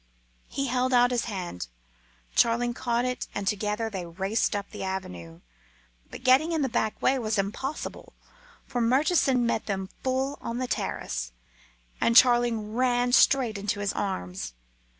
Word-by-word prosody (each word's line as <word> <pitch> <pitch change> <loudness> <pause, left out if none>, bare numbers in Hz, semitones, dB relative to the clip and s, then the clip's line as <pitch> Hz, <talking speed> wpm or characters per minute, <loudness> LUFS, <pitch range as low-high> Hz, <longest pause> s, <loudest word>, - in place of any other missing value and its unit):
He 275 - -2
held 255 0 0
out 245 0 +5
his 245 -1 0
hand; 180 - -5 0.7
Charling 240 +1 +3
caught 240 0 -1
at 250 - +1
it, 250 - -5
and 200 -1 -3
together 210 +2 0
they 195 -5 -4
raced 190 +6 -1
up 200 -1 -3
the - - -7
avenue. 90 - -6 0.7
But - - -10
getting 270 +6 +4
in 315 -3 +1
the 265 - 0
back 220 -2 -1
way 265 0 +3
was 220 -2 -1
impossible, 215 +9 -4 0.5
for 245 -2 -2
Murchison 260 0 +3
met 235 -2 -1
them 190 -2 -3
full 265 +2 -1
on 235 - -4
the 255 - -1
terrace, - - -3 0.7
and 230 - +3
Charling 240 -4 +4
ran 245 0 +2
straight 245 -6 +4
into 205 +1 -2
his 205 0 -1
arms. 90 - -4
230 Hz, 155 wpm, -27 LUFS, 200-255 Hz, 0.7 s, out